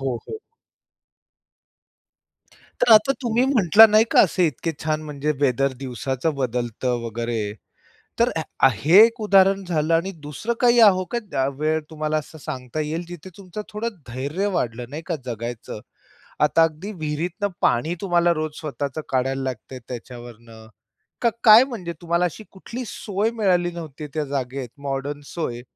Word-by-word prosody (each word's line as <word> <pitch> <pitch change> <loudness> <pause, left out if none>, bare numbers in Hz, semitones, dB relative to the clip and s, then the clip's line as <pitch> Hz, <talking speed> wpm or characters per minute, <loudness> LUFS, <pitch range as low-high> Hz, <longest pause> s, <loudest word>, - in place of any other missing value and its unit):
हो, 130 -3 -1
हो. 440 - -5 2.4
तर 235 - +5
आता 215 +5 +6
तुम्ही 240 +1 +2
म्हटला 225 - +7
नाही 215 +1 +4
का - - +6
असे 180 -1 +3
इतके 160 +2 -3
छान 155 0 -1
म्हणजे 150 0 -2
वेदर 135 0 +2
दिवसाचं 130 +4 -2
बदलतं 125 -1 -2
वगैरे. 115 -2 -3 0.7
तर 240 +2 +3 0.4
आ - - +8
हे 155 - +4
एक 230 0 -1
उदाहरण 195 -2 +4
झालं 165 -2 0
आणि 170 +4 +1 0.2
दुसरं 180 +11 -3
काही 240 -1 +4
आ 220 - +9
हो, 185 -1 -1
का 200 - -1
वेळ 155 +1 +1
तुम्हाला 155 0 -2
असं 155 +1 -10
सांगता 130 +1 -5
येईल 160 +3 -3
जिथे 175 +1 -9
तुमचं 200 +1 -8
थोडं 215 +2 -2 0.2
धैर्य 140 +11 -3
वाढलं, 120 -4 -2
नाही 150 +3 -6
का 170 - -2
जगायचं? 115 -2 -6 0.6
आता 150 +2 +4
अगदी 165 +6 -1
विहिरीतनं 170 +4 -3
पाणी 155 +8 +1
तुम्हाला 175 -3 +2
रोज 155 0 -3
स्वतःच 145 -2 -4
काढायला 135 +1 0
लागतंय 130 0 -6
त्याच्यावरनं. 120 -2 -10 0.6
का? 235 - +4
काय? 220 +1 +9
म्हणजे 210 -11 -6
तुम्हाला 170 +1 +1
अशी 180 +5 -5
कुठली 235 +6 -7
सोय 210 +2 -2
मिळाली 180 -6 +1
नव्हती, 155 -3 -8
त्या 155 -1 -1
जागेत 135 -2 -4 0.2
मॉडर्न 140 +2 -3
सोय? 120 -7 -4
155 Hz, 150 wpm, -23 LUFS, 130-190 Hz, 2.4 s, आ